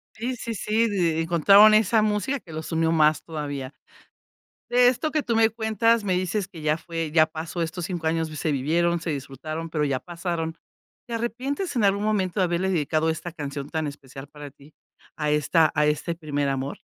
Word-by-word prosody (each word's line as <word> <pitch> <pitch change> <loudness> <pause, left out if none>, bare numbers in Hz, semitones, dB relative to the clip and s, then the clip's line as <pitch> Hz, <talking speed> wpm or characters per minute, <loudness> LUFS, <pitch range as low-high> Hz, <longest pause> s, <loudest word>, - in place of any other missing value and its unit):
Sí, 245 +3 -3
sí, 230 -1 -5
sí, 220 +3 +1
d 170 -5 +1
encontraron 195 +6 +6
esa 215 +1 +4
música 215 +6 0
que 170 - -15
los 160 +2 -6
unió 165 0 +1
más 155 -2 +3
todavía, 145 -4 -5 1.0
de 245 0 +5
esto 280 +5 0
que 305 - +1
tú 230 -4 -1
me 225 0 +4
cuentas, 225 +1 +1
me 190 -2 +1
dices 185 +2 -1
que 165 -5 -11
ya 150 0 +2
fue, 165 -2 -4
ya 155 -1 +5
pasó 160 +2 -5
estos 170 +2 -4
5 175 -2 -4
años, 160 0 0
v 155 - -8
se 155 - -1
vivieron, 170 +5 +1
se 165 0 -3
disfrutaron, 155 +4 -5
pero 150 -2 0
ya 135 -3 -1
pasaron, 170 -2 -4 0.5
¿te 235 - -5
arrepientes 255 - -3
en 225 - +2
algún 200 0 +2
momento 205 -3 0
de - - +4
haberle 175 +2 0
dedicado 155 -2 0
esta 160 +2 -4
canción 145 -3 -6
tan 160 -2 -2
especial 135 -1 -9
para 145 -1 -10
ti 140 +2 -20 0.4
a 150 -1 -1
esta 155 +2 +3
a 150 0 +3
este 150 +3 -1
primer 145 -3 -2
amor? 135 +1 -3
165 Hz, 200 wpm, -25 LUFS, 155-210 Hz, 1.0 s, encontraron